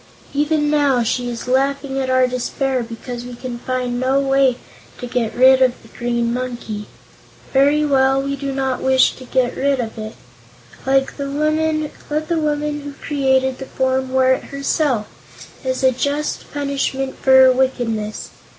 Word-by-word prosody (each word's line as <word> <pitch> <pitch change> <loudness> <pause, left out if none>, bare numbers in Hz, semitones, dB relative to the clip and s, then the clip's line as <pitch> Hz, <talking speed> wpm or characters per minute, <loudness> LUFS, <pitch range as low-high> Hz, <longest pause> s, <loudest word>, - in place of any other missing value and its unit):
Even 295 +1 +1
now 280 -5 +3
she 245 +2 -1
is 240 0 -6
laughing 270 +1 0
at 260 -1 -2
our 255 0 +4
despair 255 +1 -1
because 240 +1 -7
we 245 0 -8
can 240 -1 -6
find 250 -1 -2
no 260 +2 +2
way 270 -2 +2 0.4
to - - -6
get 240 -2 -2
rid 260 +1 +6
of 255 -1 +3
the - - -17
green 235 -1 -1
monkey. 240 -4 -5 0.7
Very 285 +3 +4
well, 270 -1 +3
we 275 +1 -2
do 275 0 -4
not 265 -1 -1
wish 265 0 +4
to 255 - -12
get 250 -1 0
rid 275 -1 +1
of 225 -1 -4
it. 215 0 -6 0.7
Let 270 0 +2
the 280 -1 -3
woman 310 +1 0
who 300 -2 -2
created 265 -2 0
the 265 - -7
form 260 0 -1
wear 260 0 +4
it - - -4
herself, 275 -4 0 0.6
as 260 0 -2
a 260 - +5
just 285 +4 -2
punishment 275 -2 -2
for 265 - +3
her 260 0 +8
wickedness. 240 -5 -1
265 Hz, 160 wpm, -19 LUFS, 250-280 Hz, 0.7 s, her